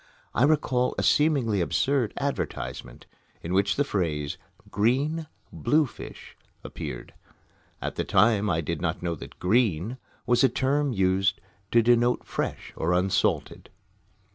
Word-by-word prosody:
I 125 - +4
recall 135 -4 +1
a - - 0
seemingly 135 - +3
absurd 130 +6 +1
advertisement, 140 - -4 0.4
in 85 - -3
which 100 +1 +2
the 145 - +2
phrase, 80 - -2 0.3
"Green 140 +10 +1 0.3
Bluefish," 150 -4 -2 0.3
appeared. - - -7 0.7
At - - -4
the - - 0
time 105 -2 +3
I 80 -2 +1
did 75 - -4
not - - -2
know 85 -1 -1
that 80 - -10
"green" 105 +1 +1 0.3
was 120 +1 +3
a 135 - +6
term 140 +3 0
used 95 -2 +1 0.3
to 115 0 +4
denote 120 +1 +3
"fresh" - - -4
or 85 +2 0
"unsalted." 90 +2 0
115 Hz, 130 wpm, -26 LUFS, 95-135 Hz, 0.7 s, a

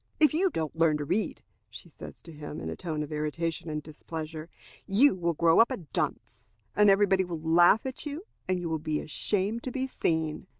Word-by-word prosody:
"If 305 -1 +5
you 370 +5 +3
don't 160 - -3
learn 165 -2 +3
to 145 - -4
read," 185 +8 -1 0.3
she - - -11
says - - -12
to 165 - -10
him, 150 - -7
in 80 0 -4
a - - -4
tone 155 -3 -3
of 150 - -8
irritation 155 +2 -2
and 150 -1 -3
displeasure, 155 +1 -7 0.4
"you 240 +9 +5
will 170 -3 -1
grow 165 +1 +4
up 230 - +6
a 260 - -3
dunce, 165 -6 -4 0.3
and 210 0 +6
every 200 +1 +5
body 190 -1 +2
will 175 -3 -5
laugh 175 +7 +5
at 260 -1 -4
you, 300 +6 -6 0.2
and 185 -1 +1
you 175 - -3
will 160 -1 -1
be 150 0 -2
ashamed 205 +8 -1
to 255 - -5
be 265 +1 -2
seen." 160 -8 -1
170 Hz, 215 wpm, -28 LUFS, 155-205 Hz, 0.4 s, up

